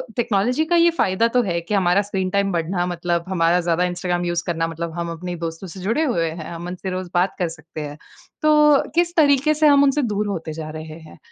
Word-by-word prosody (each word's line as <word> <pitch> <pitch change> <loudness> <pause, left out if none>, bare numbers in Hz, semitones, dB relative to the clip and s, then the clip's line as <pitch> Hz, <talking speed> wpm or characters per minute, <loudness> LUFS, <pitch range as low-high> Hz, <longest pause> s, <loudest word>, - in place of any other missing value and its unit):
Technology 240 +5 +1
का 345 - +1
ये 340 0 +5
फ़ायदा 190 +5 +2
तो 245 +1 +2
है 170 -4 -1
कि 170 +5 -5
हमारा 190 0 +3
स्क्रीन 190 -2 -2
टाइम 200 0 +1
बढ़ना 175 +1 -1
मतलब 170 -1 -2
हमारा 175 -1 +2
ज़्यादा 170 0 +1
इंस्टाग्राम 175 0 -1
यूस 175 0 -2
इंस्टाग्राम 170 -1 -4
करना 165 - +1 0.2
मतलब 160 - -10
हम 170 0 -3
अपने 175 +2 -5
दोस्तों 165 +3 -6
से 185 +3 -10
जुड़े 230 +12 0
हुए 170 - 0
हैं 160 0 -7
हम 170 +1 -7
मन 180 - -5
से 190 +1 -6
रोज़ 185 -1 -4
बात 180 +2 +1
कर 180 - +1
सकते 160 -1 -9
हैं। 145 0 -7 0.4
तो 300 -2 +4
किस 345 0 +1
तरीके 290 -1 +4
से 305 0 +3
हम 285 -1 +6
उनसे 285 +1 +2
दूर 210 -3 -1
होते 165 -5 -4
जा 155 -1 -6
रहे 155 0 -8
हैं? 160 - -14
180 Hz, 240 wpm, -21 LUFS, 170-230 Hz, 0.4 s, हम